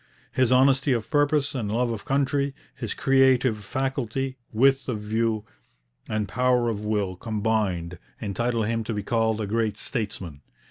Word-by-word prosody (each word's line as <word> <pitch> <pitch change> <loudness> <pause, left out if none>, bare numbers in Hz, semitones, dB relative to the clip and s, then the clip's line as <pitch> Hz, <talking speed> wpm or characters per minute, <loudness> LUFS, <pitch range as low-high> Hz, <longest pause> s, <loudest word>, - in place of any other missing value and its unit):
His 130 -2 +2
honesty 135 +1 +4
of 115 -3 -3
purpose 145 -1 +2
and 110 -6 -2
love 120 +2 +1
of 110 -3 -5
country, 140 0 0 0.2
his - - -5
creative 130 -4 +3
faculty, 135 +2 -2 0.2
width 135 +3 +3
of 115 -4 -2
view, 110 0 -1 0.6
and 110 -1 -1
power 125 0 +2
of 110 -3 -2
will 105 -3 -1
combined, 100 -5 -1 0.2
entitle 115 +2 -1
him 115 +1 -1
to 110 - -3
be 105 - -3
called 110 0 +1
a 110 - -1
great 110 0 0
statesman. 100 - -4
115 Hz, 150 wpm, -25 LUFS, 105-130 Hz, 0.6 s, honesty